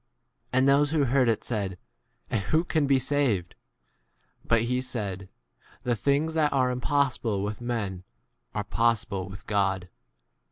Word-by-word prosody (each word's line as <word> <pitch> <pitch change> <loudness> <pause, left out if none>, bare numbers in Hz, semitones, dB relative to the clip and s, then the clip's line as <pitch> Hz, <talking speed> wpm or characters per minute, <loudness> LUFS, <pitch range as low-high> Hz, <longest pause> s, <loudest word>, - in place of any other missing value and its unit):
J 125 - 0
And 130 +1 +4
those 145 +1 +4
who 155 -1 +2
heard 130 -1 +3
it 110 - 0
said, 100 -6 -2 0.5
And 110 - +1
f - - -9
who 160 +2 +3
can 155 -4 +1
be 135 -1 +4
saved? 130 -9 0 0.9
But 115 -1 +3
he 125 +2 0
said, 100 -7 -4 0.5
The 120 -1 +1
things 145 +7 +1
that 155 -2 +2
are 130 -2 +2
impossible 125 -5 0
with 105 +3 -4
men 105 -7 -3 0.5
are - - -1
possible 110 -5 0
with 95 +1 -10
God. 95 -3 0
120 Hz, 155 wpm, -27 LUFS, 100-140 Hz, 0.9 s, And